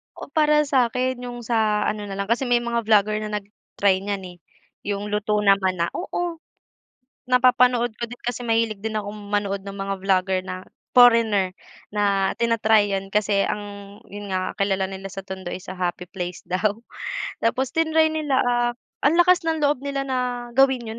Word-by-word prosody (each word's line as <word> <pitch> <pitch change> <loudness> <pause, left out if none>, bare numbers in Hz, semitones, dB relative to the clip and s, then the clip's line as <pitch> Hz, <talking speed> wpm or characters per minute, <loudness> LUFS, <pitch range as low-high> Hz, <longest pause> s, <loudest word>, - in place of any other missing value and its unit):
O, - - -10
para 300 -2 +4
sa'kin 255 -2 +1
yung 240 0 -7
sa 220 -2 +1
ano 210 -1 -2
na 195 - -5
lang, 200 - -1
kasi 245 +2 +1
may 240 -1 +2
mga 235 -2 -2
vlogger 215 0 +3
na 215 -1 -4
nag-try 200 -1 -1
niyan, 200 -1 -4
eh, 175 - -16 0.5
yung 205 0 -3
luto 210 0 0
naman 195 -2 +3
na, 170 -1 -1
oo. 350 -2 -3 0.9
Napapanood 250 -1 +4
ko 235 - -2
din 245 - -10
kasi 245 0 -3
mahilig 225 -3 0
din 220 0 -2
akong 205 0 -5
manood 200 -1 -1
ng 195 0 -8
mga 195 0 -2
vlogger 190 -1 +2
na 185 0 -5 0.3
foreigner 230 -6 +5 0.4
na 200 -2 +1
tina-try 220 -2 +3
'yon 195 0 -3
kasi 205 -1 +2
ang 205 -1 -5
yun 205 0 -8
nga, 185 -1 -2
kilala 195 -1 +1
nila 195 0 -7
sa 195 -1 -7
tondo 190 -2 -6
is 185 - -7
a 185 - -6
happy 180 -1 -3
place 180 -1 -5
daw, 205 +3 0 0.7
tapos 250 +3 0
tinry 320 -1 +3
nila, 300 -4 0
ah, 240 0 +1 0.3
ang 290 +3 +4
lakas 360 +1 +5
ng 320 -2 0
loob 285 -2 +2
nila 280 0 -2
na 260 -1 -1 0.3
gawin 265 -1 +3
'yon, 220 +1 -6
215 Hz, 175 wpm, -23 LUFS, 195-245 Hz, 0.9 s, foreigner